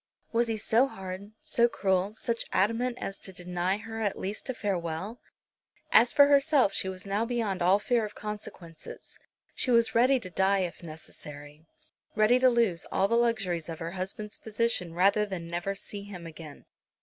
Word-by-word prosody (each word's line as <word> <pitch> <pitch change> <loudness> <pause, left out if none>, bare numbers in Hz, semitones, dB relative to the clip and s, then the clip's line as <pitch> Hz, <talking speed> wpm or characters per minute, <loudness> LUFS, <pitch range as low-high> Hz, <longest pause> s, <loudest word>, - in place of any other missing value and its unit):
Was 235 0 +2
he 225 -1 -1
so 230 +5 +3
hard, 190 -2 -8
so 235 0 +3
cruel, 195 -2 0
such 230 +1 -2
adamant 235 +5 +1
as 195 - -5
to 190 - -8
deny 180 +1 -2
her 225 +1 -7
at 205 -3 -1
least 205 +7 -5
a - - 0
farewell? 190 +2 -3 0.7
As 240 +1 +6
for 285 - +7
herself, 280 -5 +4
she 190 - 0
was 185 0 -6
now 200 +3 0
beyond 225 -6 -2
all 185 +3 +5
fear 230 +2 +1
of 210 -1 -6
consequences. 205 -6 -8 0.3
She - - -2
was 235 -2 +5
ready 255 +3 +4
to 185 -6 -8
die 190 +2 +2
if 180 -1 -3
it - - -18
were - - -7
necessary, 150 -1 -9 0.5
ready 215 +4 +4
to 255 0 +6
lose 230 -8 +1
all 195 - +2
the 225 - -1
luxuries 195 -9 0
of 165 - -5
her 165 +1 -5
husband's 195 +3 -5
position 215 -6 -1
rather 200 +4 +4
than 190 -5 -5
never 175 +4 -3
see 200 +1 -6
him 195 -4 -9
again. 155 -3 -11
200 Hz, 185 wpm, -28 LUFS, 180-230 Hz, 0.7 s, for